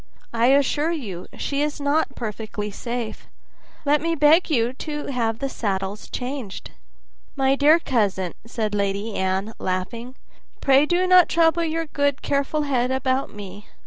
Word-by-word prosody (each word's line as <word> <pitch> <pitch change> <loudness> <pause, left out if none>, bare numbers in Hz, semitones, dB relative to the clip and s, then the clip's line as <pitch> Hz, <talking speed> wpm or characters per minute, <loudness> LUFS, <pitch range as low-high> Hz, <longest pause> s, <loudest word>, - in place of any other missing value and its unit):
I 235 +1 +3
assure 285 +3 +3
you, 215 - -5
she 280 0 -2
is 295 0 -1
not 285 -1 0
perfectly 215 -2 -5
safe; 235 +1 -5 0.6
let 290 0 +3
me 330 +1 0
beg 310 +4 +5
you 245 -4 +1
to 295 +2 -5
have 225 -3 0
the 275 - -2
saddles 200 -4 -3
changed." 250 -5 -5 0.6
"My 270 -1 +3
dear 295 +3 +6
cousin," 200 - 0
said 220 -2 -3
Lady 200 +2 -1
Anne, 190 +3 -1
laughing, 230 +7 -3 0.4
"pray 275 +2 +4
do 355 +2 +2
not 365 -1 +6
trouble 335 0 +3
your 330 0 -1
good 285 -2 -1
careful 285 +2 0
head 255 -3 0
about 260 0 0
me. 205 0 -10
260 Hz, 145 wpm, -23 LUFS, 215-295 Hz, 0.6 s, dear